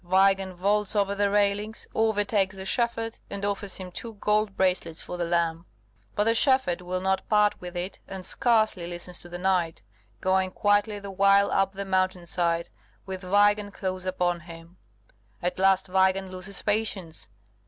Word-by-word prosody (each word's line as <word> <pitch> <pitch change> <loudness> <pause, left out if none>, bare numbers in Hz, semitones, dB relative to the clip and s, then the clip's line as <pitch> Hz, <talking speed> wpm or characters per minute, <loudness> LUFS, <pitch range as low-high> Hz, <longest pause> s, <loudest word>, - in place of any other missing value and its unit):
Weigand 190 +1 +2
vaults 205 +3 +1
over 200 -1 +1
the 200 0 +1
railings, 205 +2 0
overtakes 205 -3 +1
the 190 0 -7
shepherd, 230 0 0
and 200 0 -4
offers 200 -1 -3
him 185 -1 -8
two 225 +4 -5
gold 210 0 0
bracelets 180 -3 0
for - - -5
the 175 -1 -2
lamb. 170 0 -1 0.5
But 205 - +2
the 225 +1 +3
shepherd 260 -8 +3
will 180 +1 -3
not 190 0 -1
part 210 -1 +3
with 180 0 -7
it, 180 +2 -5
and 190 -1 -7
scarcely 215 -7 +2
listens 175 0 -3
to 175 - -6
the 175 - -6
knight, 180 - 0 0.4
going 185 0 +1
quietly 205 +1 +1
the 200 -1 -8
while 200 +1 +4
up 195 0 +1
the 200 +1 -5
mountain 185 -2 0
side, 170 -1 +1 0.4
with 190 -1 -6
Weigand 205 +2 +2
close 185 -1 -4
upon 175 -1 0
him. 170 +1 -13 0.6
At 180 +1 -3
last 190 0 +3
Weigand 190 0 +1
loses 185 +2 -3
patience. 205 -6 -1
190 Hz, 165 wpm, -26 LUFS, 180-205 Hz, 0.6 s, while